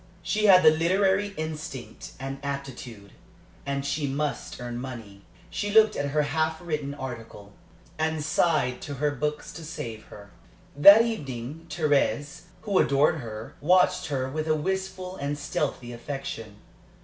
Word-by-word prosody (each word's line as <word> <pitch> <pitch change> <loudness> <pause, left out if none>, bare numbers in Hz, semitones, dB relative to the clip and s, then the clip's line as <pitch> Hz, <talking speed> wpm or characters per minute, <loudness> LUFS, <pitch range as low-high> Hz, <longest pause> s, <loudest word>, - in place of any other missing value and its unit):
She 215 0 0
had 185 -3 +8
the 155 - +9
literary 190 +5 +2
instinct 155 -4 -6
and 135 +1 -5
aptitude, 130 -7 -6 0.6
and 140 0 -2
she 145 +1 -1
must 145 +1 -3
earn 120 -1 -5
money. 115 -7 -8 0.3
She 205 - -2
looked 215 0 +5
at 140 0 -1
her 150 +1 +2
half 160 +1 0
written 150 -5 -3
article, 115 -6 -8 0.5
and 160 -1 0
sighed 155 -5 +1
to 145 - -6
her 145 +2 0
books 150 +2 -3
to 165 - -9
save 115 -8 -6
her. 100 -1 -13 0.4
That 200 +10 +9
evening 150 - -5
Thérèse, 150 +1 0 0.2
who 200 -3 +2
adored 140 +3 +3
her, 110 -5 -7
watched 180 +2 +3
her 135 -4 -1
with 155 +4 -3
a 155 - +3
wistful 185 +2 -3
and 145 +1 -3
stealthy 140 -4 -3
affection. 120 -4 -6
145 Hz, 145 wpm, -26 LUFS, 130-165 Hz, 0.6 s, the